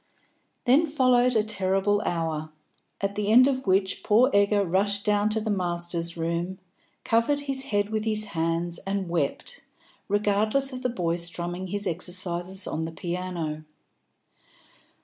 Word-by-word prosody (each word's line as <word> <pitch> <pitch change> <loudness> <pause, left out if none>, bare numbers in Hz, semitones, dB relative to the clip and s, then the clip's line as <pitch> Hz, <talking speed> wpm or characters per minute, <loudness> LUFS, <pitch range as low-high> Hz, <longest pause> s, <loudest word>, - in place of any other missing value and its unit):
Then 280 +7 +4
followed 255 -4 +3
a 215 - +3
terrible 200 0 +1
hour, 160 -3 -2 0.5
at 200 0 -1
the 205 0 -1
end 250 +3 +7
of 260 -4 -2
which 190 0 +1
poor 235 +8 +4
Egger 200 0 +3
rushed 200 +3 0
down 210 0 +2
to 220 +1 0
the 215 0 -2
Masters' 175 -2 -2
Room, 170 +3 -2 0.5
covered 235 +6 +1
his 275 -2 -2
head 205 0 0
with 215 -1 -1
his 215 -1 +1
hands 165 +1 -1
and 195 -2 -3
wept, 170 - -2 0.5
regardless 210 +6 +1
of 255 - -6
the 250 - 0
boy 175 -7 -1
strumming 175 +2 -2
his 205 +2 -2
exercises 180 +1 -1
on 160 - -3
the 165 - -5
piano. 170 -3 -4
200 Hz, 145 wpm, -26 LUFS, 175-215 Hz, 0.5 s, end